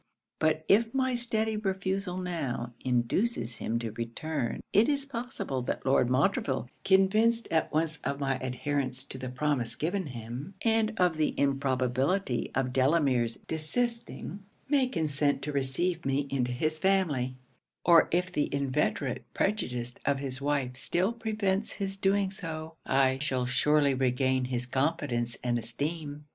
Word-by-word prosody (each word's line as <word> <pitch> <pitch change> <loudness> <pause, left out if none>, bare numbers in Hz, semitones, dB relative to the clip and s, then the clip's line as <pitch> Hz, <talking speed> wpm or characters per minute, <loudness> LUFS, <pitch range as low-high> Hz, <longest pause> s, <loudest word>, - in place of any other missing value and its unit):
But 155 0 +1
if 225 +4 +4
my 260 -1 +2
steady 220 -2 0
refusal 190 -2 -2
now, 145 -10 -3
induces 125 - 0
him 115 - -1
to 115 -1 -3
return, 120 +4 -3
it 210 +6 +5
is 280 -1 +1
possible 235 - -3
that 125 - -3
Lord 130 -2 +3
Montreville, 130 -1 +1 0.2
convinced 215 +5 +4
at 160 -1 +1
once 160 0 0
of 140 - -2
my 135 -2 0
adherence 130 0 -2
to 130 - -9
the 130 0 -4
promise 125 -3 0
given 180 +2 -1
him, 125 - -7
and 225 -1 +2
of 180 -3 +3
the 155 - 0
improbability 135 +2 +1
of 130 -1 0
Delamere's 130 -4 +3
desisting, 230 +6 -2 0.3
may 275 -2 +3
consent 145 - 0
to 150 - -2
receive 150 +6 0
me 135 +1 0
into 125 -2 0
his 155 +5 +1
family; 155 -10 +1 0.5
or 170 -1 +7
if 180 +2 +1
the 150 -4 0
inveterate 140 -1 0
prejudice 125 - -1
of 140 0 +2
his 135 -1 -4
wife 140 -3 -1
still 185 - 0
prevents 215 -3 -1
his 195 -1 -3
doing 195 0 +1
so, 160 -4 -6
I 135 0 +3
shall 130 -4 0
surely 140 +3 +3
regain 130 0 +1
his 125 -1 -2
confidence 130 -3 -1
and 120 -1 +1
esteem. 145 +5 -4
145 Hz, 145 wpm, -29 LUFS, 130-190 Hz, 0.5 s, or